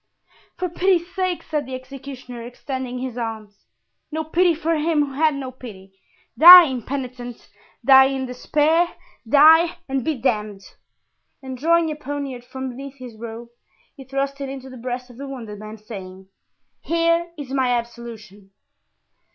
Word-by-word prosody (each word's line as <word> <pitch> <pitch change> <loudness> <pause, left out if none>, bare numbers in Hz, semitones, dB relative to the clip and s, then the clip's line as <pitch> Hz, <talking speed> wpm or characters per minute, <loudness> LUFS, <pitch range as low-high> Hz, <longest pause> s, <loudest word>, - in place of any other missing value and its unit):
"For 365 - -1
pity's 355 0 0
sake," 370 -2 -2
said 300 -4 -3
the 260 - -5
executioner, 255 -2 -9
extending 250 +1 -6
his 250 -1 -5
arms. 220 -3 -7 0.5
"No 315 +1 -2
pity 340 +2 +2
for 330 +1 -1
him 305 -1 +1
who 275 - -9
had 310 +1 +2
no 265 -2 -5
pity! 205 -7 -12 0.5
Die, 355 +3 +12
impenitent, 255 -3 -5 0.4
die 265 0 +8
in 265 -1 -2
despair, 305 +7 +1 0.3
die 320 +5 +6
and 270 -2 -2
be 310 0 -1
damned!" 210 -5 -2 0.8
And 260 -1 -6
drawing 330 +4 +2
a - - -4
poniard 280 -4 -6
from 260 +1 -6
beneath 270 +2 -9
his 250 -4 -11
robe 230 +1 -8 0.5
he 275 - -11
thrust 275 +1 -3
it 275 - -4
into 265 -1 -8
the 255 - -10
breast 250 +1 -5
of 240 - -16
the 280 +1 -7
wounded 230 -6 -8
man, 215 +1 -9
saying, 190 -3 -10 0.5
"Here 335 +1 +1
is 280 -3 -8
my 260 -2 +1
absolution!" 230 -4 -6
265 Hz, 150 wpm, -22 LUFS, 240-300 Hz, 0.8 s, Die